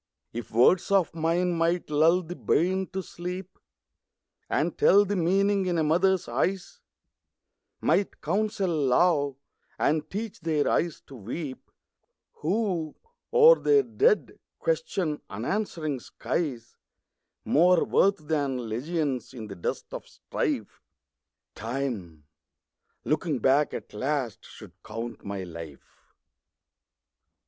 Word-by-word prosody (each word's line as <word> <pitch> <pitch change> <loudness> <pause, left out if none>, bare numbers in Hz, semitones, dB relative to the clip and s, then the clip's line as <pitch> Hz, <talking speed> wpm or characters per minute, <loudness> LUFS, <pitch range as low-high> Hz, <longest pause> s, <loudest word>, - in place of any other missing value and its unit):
If 120 -2 -6
words 125 - +4
of 195 -3 +3
mine 170 +2 +1
might 170 0 0
lull 165 +5 +4
the 175 +2 -7
bairn 185 +3 +1
to 190 0 -4
sleep, 180 +2 -7 0.9
And 160 +3 0
tell 200 +2 +5
the 205 +1 -1
meaning 195 +2 +2
in 175 -1 0
a 160 - +2
mother's 180 +4 +2
eyes; 180 +10 -2 1.0
Might 200 - +1
counsel 210 -2 0
love, 145 0 +2 0.4
and 155 0 +1
teach 215 +1 -5
their 155 -3 0
eyes 170 -2 0
to - - -16
weep 130 - -6 0.7
Who, 175 -3 -1 0.4
o'er 480 +1 +7
their 430 -1 +4
dead, 430 +1 +1 0.2
question 195 - -1
unanswering 155 - -2
skies, 120 0 -4 0.7
More 175 +3 +4
worth 195 -6 +2
than 140 -6 -1
legions 135 +2 -2
in 115 -3 -6
the 100 -2 -8
dust 85 - -4
of - - -7
strife, - - -3 0.7
Time, 110 - -4 0.8
looking 155 -1 0
back 135 +5 +3
at - - -7
last, 130 0 -2
should - - -13
count 115 +1 -7
my 100 -2 -4
life. 85 -5 -11
160 Hz, 115 wpm, -27 LUFS, 130-185 Hz, 1.0 s, o'er